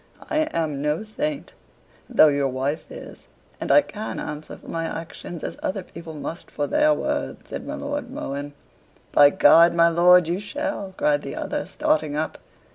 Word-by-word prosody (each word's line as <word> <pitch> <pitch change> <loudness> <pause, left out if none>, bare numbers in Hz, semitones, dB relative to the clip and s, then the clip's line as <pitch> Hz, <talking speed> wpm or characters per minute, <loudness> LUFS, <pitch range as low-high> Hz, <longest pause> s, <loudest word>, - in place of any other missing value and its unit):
"I 310 0 +2
am 150 - -2
no 150 +6 0
saint, 285 +7 -4 0.6
though 220 -11 +6
your 140 -1 +1
wife 135 +4 -3
is - - -11 0.3
and - - -1
I 295 - +7
can 215 +1 -6
answer 150 +1 -6
for - - -17
my 165 0 -3
actions 165 +1 -7
as - - -5
other 190 0 -2
people 165 -2 -10
must 160 +3 -7
for 145 - -2
their 300 - +3
words," 300 - -2
said - - -6
my - - -4
Lord 290 -2 -4
Mohun. 145 - -5 0.6
"By 145 -1 +7
G, 145 - +4 0.3
my 170 0 +5
lord, 175 +1 +6
you 175 +3 -1
shall," 205 -3 -4
cried 295 0 +2
the - - -6
other, - - -3
starting 305 - 0
up. 155 +1 -3
170 Hz, 175 wpm, -23 LUFS, -, 0.6 s, I